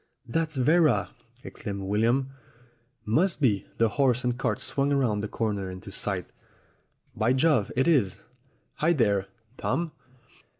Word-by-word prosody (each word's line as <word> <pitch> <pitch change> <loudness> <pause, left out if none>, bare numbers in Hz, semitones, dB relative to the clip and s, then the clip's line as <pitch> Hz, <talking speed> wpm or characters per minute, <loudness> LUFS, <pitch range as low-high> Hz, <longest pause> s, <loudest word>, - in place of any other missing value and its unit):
'That's 155 +5 -1
Vera!" 155 +3 +3 0.3
exclaimed 100 -3 -6
William. 115 +7 +1 0.7
"Must 160 - +2
be." 105 -9 +1
The 115 - +4
horse 125 -1 +2
and 125 -1 0
cart 120 -4 -1
swung 140 0 0
round 125 -7 +1
the 105 - -3
corner 100 -4 -2
into 95 +2 -9
sight. 95 -2 -1 0.9
"By 115 +4 +2
Jove, 130 -6 +2
it 135 - +2
is! 125 - +2 0.5
Hi, 165 +3 +3
there! 100 - +1 0.3
Tom!" 160 +5 -1
125 Hz, 130 wpm, -27 LUFS, 105-140 Hz, 0.9 s, The